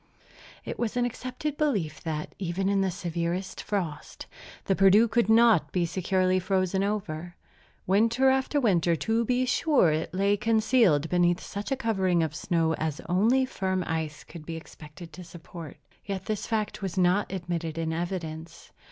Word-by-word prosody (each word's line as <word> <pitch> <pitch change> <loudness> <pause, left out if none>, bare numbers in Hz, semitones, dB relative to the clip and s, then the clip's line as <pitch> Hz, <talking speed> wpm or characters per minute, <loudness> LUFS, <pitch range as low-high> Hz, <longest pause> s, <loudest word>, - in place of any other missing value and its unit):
It - - -6
was 235 0 -2
an 245 - +2
accepted 255 +4 -4
belief 205 - -1
that, 155 -2 -4
even 190 +1 -1
in 200 -1 +2
the 190 - +1
severest 175 +1 -3
frosts, 175 -8 -4 0.4
the 195 - +2
Perdu 195 +4 +6
could 230 -2 +1
not 220 -9 +5
be 180 -2 +1
securely 185 +1 +1
frozen 185 0 0
over. 175 -5 -3 0.5
Winter 230 +7 +3
after 265 +2 +1
winter, 175 - +2
to 225 +7 0
be 250 +2 +1
sure, 255 - +3
it 155 +1 -2
lay 200 +2 +1
concealed 220 - +3
beneath 175 0 +2
such 200 +4 -6
a - - +3
covering 190 -8 +1
of 155 -2 -2
snow 165 0 0
as 155 -1 -2
only 225 +9 +3
firm 190 -7 -2
ice 160 -2 -3
could 170 -3 -11
be 165 +1 -6
expected 165 0 -12
to 180 - -9
support. 170 -2 -10 0.3
Yet 195 -2 -5
this 215 -2 -3
fact 215 -2 -2
was 190 -2 -4
not 185 +3 +2
admitted 170 -3 -4
in 160 -1 -2
evidence. 165 -2 -5
185 Hz, 160 wpm, -27 LUFS, 170-220 Hz, 0.5 s, Perdu